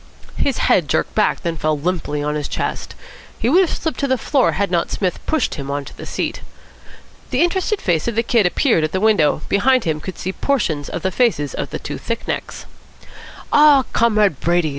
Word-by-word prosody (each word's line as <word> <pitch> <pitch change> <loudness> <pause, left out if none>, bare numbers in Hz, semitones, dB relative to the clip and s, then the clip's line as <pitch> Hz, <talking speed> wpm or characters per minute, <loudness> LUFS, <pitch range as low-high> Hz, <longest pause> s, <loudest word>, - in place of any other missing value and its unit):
His 275 - 0
head 170 -5 +2
jerked - - 0
back, 215 - +1
then 170 -2 -3
fell 155 0 0
limply 150 -2 -2
on 150 0 -1
his 150 -1 -3
chest. - - -4 0.4
He 235 - 0
would 350 +7 +5
have 365 - +1
slipped 320 - -3
to 280 - 0
the 260 -1 +1
floor 270 +3 +1
had 200 -1 -1
not 170 -2 0
Psmith 185 -3 -2
pushed 310 -8 0
him 140 -2 -6
on 140 0 -3
to - - -11
the - - -9
seat. - - -3 0.9
The - - +2
interested 380 +4 0
face 170 -3 0
of 235 - -1
the 230 - +2
Kid 230 -4 +3
appeared 180 - +2
at 155 - -2
the 190 - +1
window. 190 -8 +2
Behind 255 +5 +3
him 155 -2 -2
could 185 +3 -6
be - - -16
seen 185 - -3
portions 160 - 0
of - - -5
the 190 - 0
faces 170 - +1
of - - -4
the - - -4
two - - -6
thick - - -4
necks. - - -4 0.9
"Ah, 295 -3 +6
Comrade 210 - +2
Brady!" 170 -2 +1
190 Hz, 215 wpm, -19 LUFS, 155-255 Hz, 0.9 s, Ah